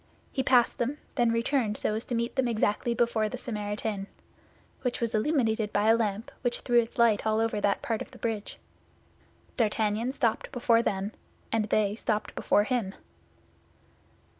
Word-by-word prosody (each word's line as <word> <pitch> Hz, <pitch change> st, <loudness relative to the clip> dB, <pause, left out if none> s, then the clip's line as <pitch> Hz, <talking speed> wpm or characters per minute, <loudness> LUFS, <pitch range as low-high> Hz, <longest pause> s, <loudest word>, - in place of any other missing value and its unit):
He 265 Hz, -, 0 dB
passed 250 Hz, -2 st, +3 dB
them, 260 Hz, +5 st, -1 dB, 0.2 s
then 240 Hz, -3 st, +2 dB
returned 230 Hz, -2 st, 0 dB
so -, -, -1 dB
as 220 Hz, +2 st, -3 dB
to 245 Hz, -, -2 dB
meet 235 Hz, +1 st, -1 dB
them 265 Hz, -2 st, +2 dB
exactly 230 Hz, +1 st, 0 dB
before 230 Hz, -2 st, +1 dB
the 250 Hz, -, -5 dB
Samaritaine, 210 Hz, -3 st, -3 dB, 0.7 s
which 250 Hz, -2 st, -1 dB
was 235 Hz, -2 st, -1 dB
illuminated 220 Hz, -3 st, +1 dB
by 205 Hz, +2 st, +2 dB
a 225 Hz, -, +7 dB
lamp 215 Hz, -1 st, -2 dB
which 245 Hz, -1 st, -1 dB
threw 240 Hz, -1 st, +4 dB
its 230 Hz, -1 st, -3 dB
light 230 Hz, -3 st, +4 dB
over 220 Hz, 0 st, +1 dB
all -, -, -2 dB
that 200 Hz, -1 st, +1 dB
part 225 Hz, -2 st, -1 dB
of -, -, -6 dB
the -, -, -14 dB
bridge. 220 Hz, -3 st, -3 dB, 1.0 s
D'Artagnan 220 Hz, +1 st, +1 dB
stopped 245 Hz, -5 st, -1 dB
before 235 Hz, -3 st, +3 dB
them, 195 Hz, -2 st, -1 dB, 0.4 s
and 225 Hz, -1 st, +1 dB
they 210 Hz, -1 st, +1 dB
stopped 215 Hz, -1 st, -2 dB
before 205 Hz, -, +2 dB
him. 215 Hz, -4 st, -1 dB
225 Hz, 165 wpm, -28 LUFS, 210-240 Hz, 1.0 s, a